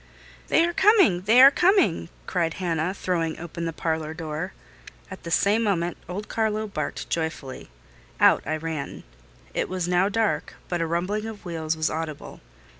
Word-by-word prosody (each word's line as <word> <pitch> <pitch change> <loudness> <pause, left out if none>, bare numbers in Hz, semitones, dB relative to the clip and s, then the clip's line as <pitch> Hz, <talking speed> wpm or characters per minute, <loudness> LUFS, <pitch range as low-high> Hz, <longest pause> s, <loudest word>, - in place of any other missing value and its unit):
"They 330 - +4
are 345 - -2
coming! 380 - +5
they 235 +5 +7
are 275 - +10
coming!" 350 - +2 0.2
cried 165 -3 -1
Hannah, 175 0 -1
throwing 165 -4 -1
open 170 0 -6
the 165 - -2
parlour 160 -1 -3
door. 160 +2 -4 0.6
At 190 - -8
the 170 - -7
same 205 +6 +3
moment 175 -6 0
old 200 +4 -5
Carlo 220 -1 -1
barked 155 -8 -4
joyfully. 160 - -4 0.5
Out - - +5
I 155 +1 0
ran. 155 -3 -5 0.5
It - - -1
was 185 -2 -2
now 180 +2 +2
dark; 220 0 -1
but 175 -1 -1
a 165 - 0
rumbling 185 +6 -1
of 215 -3 -9
wheels 160 -2 -2
was 155 0 0
audible. 155 -2 -6
175 Hz, 165 wpm, -25 LUFS, 160-210 Hz, 0.6 s, are